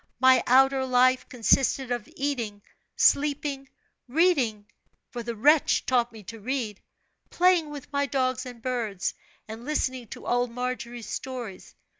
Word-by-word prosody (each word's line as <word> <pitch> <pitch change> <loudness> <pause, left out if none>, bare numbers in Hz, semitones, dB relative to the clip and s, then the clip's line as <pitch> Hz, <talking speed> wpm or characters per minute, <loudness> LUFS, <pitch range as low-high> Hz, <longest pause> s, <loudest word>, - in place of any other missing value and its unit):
My 260 0 +6
outer 265 +1 +5
life 255 0 +3
consisted 255 +1 +2
of 240 -2 -3
eating, 235 -8 -3 0.3
sleeping, 280 -1 +1 0.4
reading 255 - +2 0.5
for 240 - -5
the 235 0 -5
wretch 295 +7 +3
taught 245 -2 +1
me 220 -2 -12
to 225 +4 -9
read 225 -3 -3 0.5
playing 355 -3 +3
with 290 -1 -10
my 280 0 +1
dogs 255 -1 -1
and 240 -2 -11
birds, 230 -7 -2 0.3
and 220 +2 -8
listening 260 -4 -2
to - - -10
old 245 0 +1
Margery's 245 -1 -5
stories. 245 -7 -7
255 Hz, 135 wpm, -26 LUFS, 235-275 Hz, 0.5 s, My